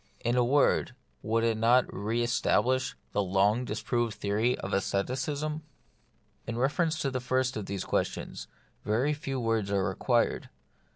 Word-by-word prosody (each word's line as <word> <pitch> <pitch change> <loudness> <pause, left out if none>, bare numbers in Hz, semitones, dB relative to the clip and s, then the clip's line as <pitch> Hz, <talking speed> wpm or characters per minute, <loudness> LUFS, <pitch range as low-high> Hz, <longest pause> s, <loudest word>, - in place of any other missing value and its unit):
In 120 +1 +2
a 125 - +4
word, 130 0 +2 0.3
would 115 +1 0
it 115 -1 +1
not 120 +3 +5
re 110 +4 -1
establish 130 +2 +1 0.2
the 105 - +1
long 100 +5 +2
disproved 120 -2 -1
theory 110 +5 0
of - - -5
asceticism? 135 +10 -1 0.9
In 115 0 -3
reference 155 +5 +1
to 135 - 0
the 130 - -1
first 130 +1 0
of 105 -3 -4
these 100 -2 -3
questions - - -2 0.4
very 125 +8 +1
few 135 -2 -4
words 115 -4 0
are 100 -1 +1
required. - - 0
120 Hz, 150 wpm, -29 LUFS, 110-130 Hz, 0.9 s, not